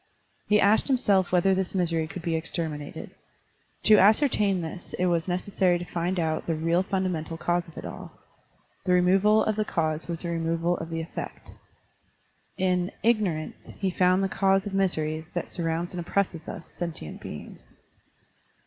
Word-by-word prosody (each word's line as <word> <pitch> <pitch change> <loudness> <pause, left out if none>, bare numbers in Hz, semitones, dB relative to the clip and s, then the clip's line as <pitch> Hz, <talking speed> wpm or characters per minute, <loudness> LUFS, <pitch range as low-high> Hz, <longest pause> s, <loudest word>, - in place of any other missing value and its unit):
He 210 0 +4
asked 205 +2 +4
himself 205 -9 +2
whether 185 +2 +4
this 190 0 -1
misery 165 -3 +1
could 170 +2 -8
be 165 -1 0
exterminated. 160 -2 -4 0.7
To 215 -1 +8
ascertain 210 -2 +4
this 170 +2 -7
it 180 - +1
was 170 -1 +1
necessary 180 0 +1
to 175 - -6
find 175 +1 -2
out 160 -1 -1
the 165 - +1
real 165 +3 +1
ftmda 190 -1 -1
mental 165 -1 -4
cause 175 +1 0
of 165 - -15
it - - -6
all. - - -8 0.7
The 180 - +3
removal 195 +4 +4
of 215 -1 0
the 215 - +2
cause 160 -5 -1
was 170 0 -4
the 170 - -3
removal 165 +1 0
of 165 - -6
the 165 0 -3
effect. 165 - -7 1.1
In 180 -1 +1
Ignorance 205 -9 0
he 195 -2 -1
found 185 +1 +3
the - - +2
cause 195 0 +2
of 205 - -5
misery 160 -5 0
that 175 - -3
surrounds 170 0 -2
and 180 - -4
oppresses 170 -2 -1
us, - - -7
sentient 170 - -6
beings. - - -9
180 Hz, 165 wpm, -26 LUFS, 165-195 Hz, 1.1 s, To